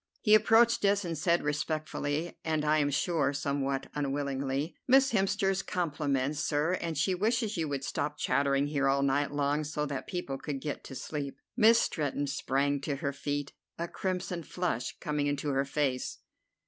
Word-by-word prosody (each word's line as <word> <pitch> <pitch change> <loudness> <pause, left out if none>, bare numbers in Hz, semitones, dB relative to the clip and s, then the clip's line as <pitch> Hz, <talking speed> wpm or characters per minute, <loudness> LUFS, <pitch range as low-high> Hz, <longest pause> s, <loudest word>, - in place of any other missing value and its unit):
He 210 - +4
approached 225 +2 +5
us, 200 0 +3
and 170 -1 -2
said 170 +3 +2
respectfully, 150 +1 -2
and 155 -2 0
I 155 +1 +3
am 145 -1 +2
sure 145 0 +1
somewhat 140 -1 -1
unwillingly: 140 +1 -2
"Miss 270 +1 +5
Hemster's 195 -1 +1
compliments, 145 -4 -1
sir, 150 +4 +1
and 165 -3 -3
she 180 +6 +2
wishes 220 +3 0
you 165 -2 -1
would 140 -1 -3
stop 150 +1 -2
chattering 140 +1 +2
here 145 -2 0
all 140 0 +2
night 140 +1 +2
long, 145 +1 0
so 150 0 -2
that 140 -2 -4
people 140 -7 -4
could 145 -3 -4
get 145 +1 -4
to 135 - -8
sleep." 140 0 -5 0.2
Miss 230 -1 +6
Stretton 145 -6 -1
sprang 140 0 0
to 140 0 -2
her 140 +1 -2
feet, 145 0 -3 0.2
a 170 - -2
crimson 180 -1 -3
flush 165 -6 -3
coming 150 -1 -1
into 145 +1 -1
her 135 0 +1
face. 140 -2 -1
145 Hz, 170 wpm, -30 LUFS, 140-175 Hz, 0.2 s, Miss